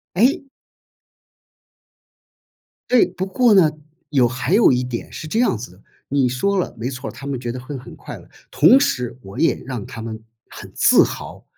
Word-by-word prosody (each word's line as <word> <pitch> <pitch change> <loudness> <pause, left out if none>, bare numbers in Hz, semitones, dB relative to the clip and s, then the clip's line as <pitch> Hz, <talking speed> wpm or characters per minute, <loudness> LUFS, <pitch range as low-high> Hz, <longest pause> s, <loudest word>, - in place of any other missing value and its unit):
诶。 260 +7 +2 2.4
对， 250 -2 +5
不 185 +1 -5
过 235 +4 +3
呢， 185 -6 +5 0.4
有 135 -4 +3
还 130 +7 -1
有 220 - +6
一 125 - +1
点 125 -2 -6
是 155 - -7
这 220 +9 0
样 235 - +2
子 105 -5 -9
的。 95 - -21 0.3
你 140 -1 +2
说 190 +12 0
了， 180 - -2
没 115 +3 -3
错 125 0 -6
儿， - - -13
他 140 - -10
们 140 -2 -3
觉 120 -1 -4
得 125 - -6
会 140 +3 -7
很 130 - -11
快 - - -9
乐， - - -15 0.2
同 165 - +6
时 125 - -1
我 95 0 -11
也 165 - +1
让 125 -6 -5
他 115 - -9
们 110 -1 -7 0.2
很 - - -11
自 - - +5
豪。 - - -8
130 Hz, 200 characters per minute, -20 LUFS, 125-190 Hz, 2.4 s, 有